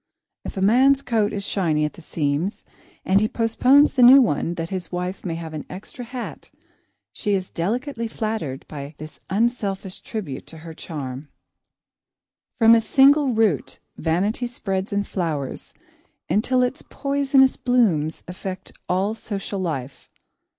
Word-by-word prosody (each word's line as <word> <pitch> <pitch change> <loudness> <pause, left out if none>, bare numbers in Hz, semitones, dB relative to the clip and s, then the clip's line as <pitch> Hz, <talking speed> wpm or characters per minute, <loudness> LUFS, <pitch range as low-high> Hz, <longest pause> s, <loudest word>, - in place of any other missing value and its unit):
If - - -7
a - - -1
man's 265 +6 +4
coat 220 -3 +1
is 200 -1 -3
shiny 160 -7 +1
at 150 - -4
the - - -13
seams 155 +4 -2 0.4
and 195 +2 +4
he 215 - +2
postpones 250 +6 +4
the 255 - +2
new 255 +3 +10
one 175 - +1
that 165 +1 -5
his 185 -3 -4
wife 180 +1 -4
may 170 -3 -3
have 165 -1 -7
an 155 - -5
extra 200 +6 -9
hat, 245 0 -7 0.6
she 205 -3 0
is 185 -1 -4
delicately 230 - -2
flattered 215 -12 -4
by 145 0 -8
this 155 0 -10
unselfish 200 -3 -1
tribute 185 - -6
to 165 - -11
her 165 - -7
charm. 145 -3 -7 1.3
From 230 -1 +7
a 230 - +5
single 270 +2 +4
root 215 -10 +1 0.2
vanity 200 +9 0
spreads 195 -4 -3
and 200 0 0
flowers 155 -7 -3 0.6
until 250 +4 +2
its 250 +2 -2
poisonous 275 -1 +2
blooms 190 -12 +1
affect 185 +1 -7 0.2
all 190 +4 +1
social 200 -3 -5
life. 140 -7 -4
200 Hz, 145 wpm, -23 LUFS, 165-235 Hz, 1.3 s, new